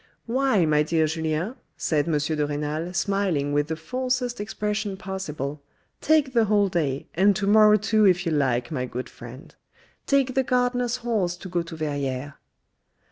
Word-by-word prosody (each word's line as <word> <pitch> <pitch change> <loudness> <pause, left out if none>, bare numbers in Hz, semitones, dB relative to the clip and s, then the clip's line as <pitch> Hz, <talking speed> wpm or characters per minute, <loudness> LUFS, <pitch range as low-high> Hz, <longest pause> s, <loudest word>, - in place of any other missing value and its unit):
" - - -44
Why, 245 -6 +2
my 150 -1 +3
dear 160 +1 +2
Julien," 160 +7 -2 0.2
said 150 -1 0
M. 160 -3 +2
de 150 0 -1
Renal 150 +3 -3
smiling 180 -6 0
with 145 0 +1
the 160 - -2
falsest 250 +6 -2
expression 210 -1 -3
possible, 155 -7 -5 0.2
" - - -45
take 300 -4 +3
the 230 -2 +4
whole 205 -1 +3
day, 145 -7 -1
and 195 +4 +4
to 200 +1 -1
morrow 210 +1 +6
too 215 +1 +2
if 180 0 +2
you 165 - 0
like, 130 -4 0
my 125 -4 -2
good 125 +1 -5
friend. 125 +3 -12 0.5
Take 275 -2 +2
the 265 - +3
gardener's 245 -1 0
horse 200 -7 0
to 185 - -9
go 175 -1 0
to 170 0 -8
Verrieres." 145 -3 -3
175 Hz, 175 wpm, -25 LUFS, 150-215 Hz, 0.5 s, morrow